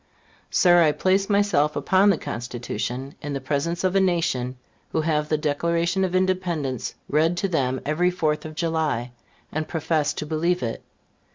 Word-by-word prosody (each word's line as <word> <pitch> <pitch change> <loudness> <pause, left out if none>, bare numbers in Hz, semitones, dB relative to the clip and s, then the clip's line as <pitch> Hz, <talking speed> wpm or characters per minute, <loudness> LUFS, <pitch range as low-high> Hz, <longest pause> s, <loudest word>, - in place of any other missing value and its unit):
Sir, 175 -2 +5
I 155 -3 +4
place 195 +4 +1
myself 200 -8 +2
upon 190 +8 +3
the 195 - +3
Constitution, 120 +3 -4
in 145 0 -4
the 140 - -2
presence 150 +6 -2
of 185 0 +1
a - - +5
nation 165 -9 0 0.3
who 160 - +1
have 155 -1 0
the 155 - +2
Declaration 170 +5 0
of 185 -1 -1
Independence 175 -9 -1
read 160 +4 +2
to 195 - 0
them 130 -7 0
every 165 +5 +2
Fourth 155 -4 -1
of 155 0 -8
July, 155 -7 -1 0.4
and 155 0 -2
profess 160 -2 0
to - - -4
believe 165 +2 0
it. 115 -1 -3
160 Hz, 165 wpm, -24 LUFS, 145-180 Hz, 0.4 s, Sir